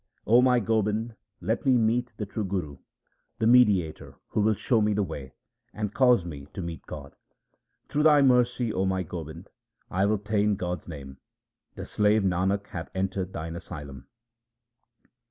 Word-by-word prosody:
1 110 - -1
0 - - +7
my 125 -1 +4
Gobind, 110 +1 0 0.3
let 115 - -1
me 130 -2 +4
meet 120 +2 +1
the 105 - -3
true 105 +2 -4
Guru, 90 -8 -3 0.6
the - - 0
mediator 105 -9 +3
who - - 0
will 110 +1 +3
show 115 +3 +1
me 105 0 +2
the 105 - +1
way, 65 -7 -7 0.4
and 105 -1 -3
cause 125 -8 +4
me 75 -5 -8
to - - -4
meet 85 -1 -7
God! 70 -2 -9 0.7
Through 150 - 0
Thy 150 -2 +6
mercy, 125 -3 +3
O 95 - 0
my 95 -1 0
Gobind, 85 +1 -8 0.4
I 95 - -3
have 100 +1 +3
obtained 105 -1 +1
God's 90 -2 -4
name; 70 -5 -9 0.6
the - - -6
slave 105 0 +2
Nanak 95 +2 0
hath 85 -1 -6
entered 95 0 -2
Thine 80 0 -5
asylum. 70 -7 -9
100 Hz, 165 wpm, -27 LUFS, 85-110 Hz, 0.7 s, 0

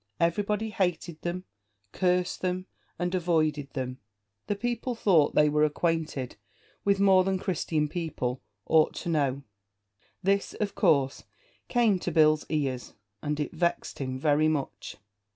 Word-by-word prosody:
Everybody 205 +6 0
hated 175 -4 -1
them, 175 +1 -3 0.5
cursed 180 0 0
them, 185 0 -1 0.3
and 175 +1 -2
avoided 155 -5 +1
them. 130 -1 -4 0.5
The 205 - 0
people 240 +3 -2
thought 175 -10 +3
they 150 - +6
were 150 +1 +2
acquainted 155 -5 -1 0.5
with 200 -1 +2
more 190 -2 +6
than 190 0 0
Christian 160 -4 -1
people 145 -7 -3 0.2
ought 160 -1 +3
to - - -4
know. 140 -4 0 0.8
This, 200 +1 +1
of 210 -2 -2
course, 140 -8 +2 0.4
came 230 -6 +3
to 180 - -2
Bill's 155 -1 +4
ears, 135 -5 -2 0.3
and 150 0 -2
it 150 - -2
vexed 170 +1 -1
him 130 -2 -3
very 150 +2 +3
much. 140 -10 -3
165 Hz, 135 wpm, -28 LUFS, 150-185 Hz, 0.8 s, they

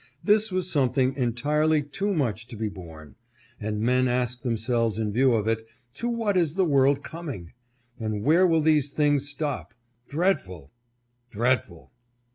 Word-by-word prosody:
This 215 0 +3
was 185 -1 -1
something 130 -2 +2
entirely 145 +5 +1
too 195 +8 -2
much 115 - -1
to 120 - -9
be 110 0 -2
borne; 80 -7 -12 0.4
and 105 0 -3
men 125 +3 +2
asked 125 0 -1
themselves 115 -2 0
in 110 -2 -1
view 130 +2 +4
of 110 -2 0
it, 115 0 0 0.3
To 240 - -3
what 225 -4 0
is 170 -4 +1
the 190 -1 +2
world 140 -2 +3
coming? 140 - -7 0.5
and 110 -2 -3
where 165 +8 +5
will 165 -2 +2
these 150 -3 +3
things 145 -1 +1
stop? 135 - -4 0.3
Dreadful! 140 - -1 0.6
Dreadful 115 -6 -1
130 Hz, 150 wpm, -26 LUFS, 110-155 Hz, 0.6 s, where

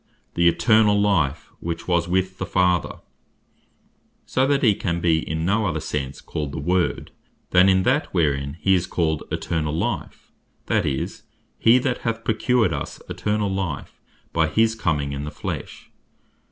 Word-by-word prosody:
"The 85 0 +3
eternall 110 +1 +4
life, 80 -8 +1
which 85 0 -5
was 85 -1 +1
with 95 +1 -1
the - - -2
Father:" 90 -2 +1 1.2
so 130 +1 +1
that 140 0 +1
he 110 -4 +6
can 85 -3 -2
be 85 -2 +2
in 80 +1 -3
no 105 +3 +1
other 80 -3 -1
sense 70 -2 -4
called 75 -2 -5
the - - -4
Word, 90 +4 0 0.4
then 90 +1 +6
in 95 0 +3
that, 130 +7 +1
wherein 70 -4 0
he 95 - +3
is 90 -2 +1
called 80 -3 0
Eternall 80 -2 -2
life; - - -4 0.3
that - - +1
is, 65 -2 -3 0.4
"he 115 +2 +6
that 130 -1 -1
hath 115 0 -3
procured 110 -3 +2
us 70 - -5
Eternall 105 -2 -1
life," 95 -7 -4 0.3
by 80 -1 +2
his 110 +8 +2
comming 75 -10 -1
in 70 0 -4
the 75 - -4
flesh. - - -7
90 Hz, 160 wpm, -23 LUFS, 80-105 Hz, 1.2 s, he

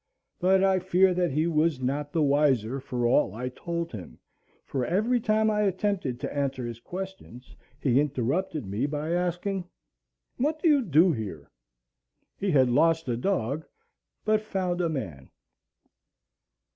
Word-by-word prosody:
But 190 +1 +3
I 190 -1 +3
fear 185 +1 +3
that 175 -1 +1
he 155 +4 0
was 160 -3 +1
not 140 +3 -2
the 160 -1 +1
wiser 140 -4 +2
for 125 -3 -3
all 120 -1 +2
I 125 +2 -3
told 170 +5 -4
him, 90 - -9 0.5
for 130 - -2
every 215 - +1
time 220 -1 +2
I 210 0 +1
attempted 190 -9 -1
to - - -4
answer 135 -3 -1
his 120 -1 -6
questions 185 -6 -8 0.2
he 130 -3 +3
interrupted 145 - -1
me 105 +8 -1
by 150 +2 -3
asking, 180 +2 -1 0.7
"What 300 +4 0
do 335 - +1
you 295 -3 +5
do 170 - +4
here?" 100 - -6 0.8
He 200 - -2
had 130 -6 +4
lost 165 +4 +3
a 120 - +1
dog, 145 - -1 0.6
but 215 0 +3
found 185 -4 -2
a 170 - +1
man. 85 - -5
160 Hz, 150 wpm, -27 LUFS, 130-190 Hz, 0.8 s, you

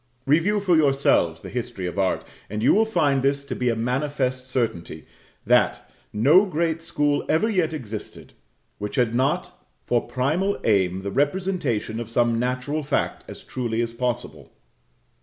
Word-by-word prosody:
Review 165 +9 +3
for 190 -4 +2
yourselves 135 - +2
the - - -8
history 120 -6 -4
of 90 +3 -4
art, 95 -1 +1 0.3
and 105 +2 -3
you - - +5
will 220 +2 +4
find 150 -10 +2
this 140 +1 0
to - - -4
be 125 -1 0
a 115 - +1
manifest 130 +1 -1
certainty, 115 -9 -3 0.4
that - - +2 0.2
_no 155 - +5
great 165 -1 -1
school 145 -3 0
ever 160 +8 +3
yet 180 -7 +1
existed 115 -9 -7 0.5
which 105 +4 -4
had 120 -4 +1
not 130 +3 -1 0.2
for 120 -1 +2
primal 145 +11 0
aim 95 -3 +1
the 100 - -3
representation 145 - -1
of 120 -2 -6
some 115 -1 +2
natural 125 +5 -1
fact 145 0 -1
as - - -10
truly 115 -3 -3
as 115 -1 -1
possible_. 125 -1 -4
130 Hz, 160 wpm, -24 LUFS, 115-155 Hz, 0.5 s, you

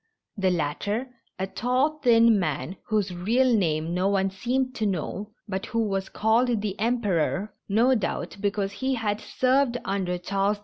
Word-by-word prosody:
The 195 -3 +1
latter 195 - -1 0.2
— - - -43
a 190 - -1
tall, 255 +9 0
thin 230 -4 +5
man, 155 +1 -2
whose 210 -4 0
real 235 +8 +2
name 165 -4 0
no 180 +2 +1
one 195 -1 +1
seemed 255 +6 -1
to 215 - +1
know, 195 +3 -3 0.2
but 190 -2 -3
who 230 -1 0
was 195 -1 -2
called 230 +2 +2
the 205 -2 -2
Emperor, 210 -4 0 0.2
no 230 +6 +4
doubt 215 -3 -2
because 200 -1 -1
he 260 +6 -1
had 210 -2 -2
served 255 -1 +1
under 190 -2 -1
Charles 195 +3 0
X. - - -22
205 Hz, 170 wpm, -26 LUFS, 190-240 Hz, 0.2 s, thin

